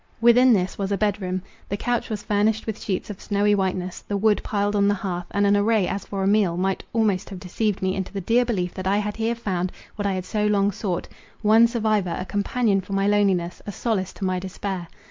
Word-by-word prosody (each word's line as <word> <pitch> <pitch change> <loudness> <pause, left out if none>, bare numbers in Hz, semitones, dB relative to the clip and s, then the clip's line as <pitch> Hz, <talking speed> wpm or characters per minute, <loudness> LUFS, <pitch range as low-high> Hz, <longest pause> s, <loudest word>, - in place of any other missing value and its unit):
Within 240 +2 +6
this 185 -4 +1
was 195 0 -2
a 200 - +1
bed 205 +1 0
room; 185 0 -3 0.3
the 200 - -1
couch 240 +2 -1
was 210 -2 -4
furnished 210 +1 +1
with 220 -2 -4
sheets 195 +1 -3
of 200 - -10
snowy 205 0 +2
whiteness; 185 -2 -1
the 205 - -3
wood 210 +1 +3
piled 205 0 0
on 200 0 +3
the 205 - +3
hearth, 180 -3 -4
and 205 0 +1
an 200 0 +4
array 205 -1 +2
as 195 0 -3
for 195 -1 -3
a - - +1
meal, 200 -4 +3
might 190 +1 -1
almost 210 -4 +1
have 190 -3 -7
deceived 200 +2 -2
me 190 0 +1
into 190 -1 -4
the 200 - -4
dear 235 +6 +3
belief 185 -7 -2
that 185 -1 -4
I 200 +1 +3
had 210 0 -2
here 225 +1 0
found 185 -5 -2 0.3
what 205 -1 -1
I 195 - 0
had 185 -1 -3
so 210 +2 0
long 205 -1 +2
sought—one 215 +4 +1
survivor, 215 -6 0
a 185 - -4
companion 205 +1 +1
for 190 +2 -8
my 195 0 +1
loneliness, 195 -4 +1
a - - -2
solace 200 -2 -1
to 195 - -4
my 185 -1 0
despair. 190 -1 -5
200 Hz, 235 wpm, -24 LUFS, 185-210 Hz, 0.3 s, Within